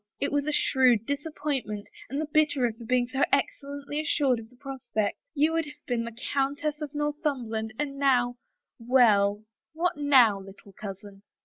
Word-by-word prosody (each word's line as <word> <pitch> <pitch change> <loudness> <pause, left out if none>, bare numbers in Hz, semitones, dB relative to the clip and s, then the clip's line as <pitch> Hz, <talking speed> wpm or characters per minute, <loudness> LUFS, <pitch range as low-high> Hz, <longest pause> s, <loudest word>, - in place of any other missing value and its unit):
It 280 - -1
was 290 0 0
a - - +1
shrewd 255 -6 +3
disappointment, 285 -7 -3 0.2
and 275 +4 -2
the 310 - -1
bitterer 290 -6 +2
for 230 +1 -12
being 245 +1 +2
so 265 +2 -3
excellently 285 +1 -1
assured 280 -5 +1
of 225 0 -11
the 250 - -21
prospect. 250 -6 -3 0.2
You 305 +3 +3
would 330 -1 +1
have 295 0 -13
been 240 -3 -1
the 230 -1 -8 0.2
Countess 290 +2 -1
of 295 -1 -6
Northumberland, 275 -7 -2
and 275 -2 -3
now 245 -3 +3 0.2
— - - -62
well, 215 -4 +4 0.3
what 345 +1 0
now, 260 -8 +5
little 195 +1 -13
cousin 195 0 -9
265 Hz, 170 wpm, -27 LUFS, 230-290 Hz, 0.3 s, now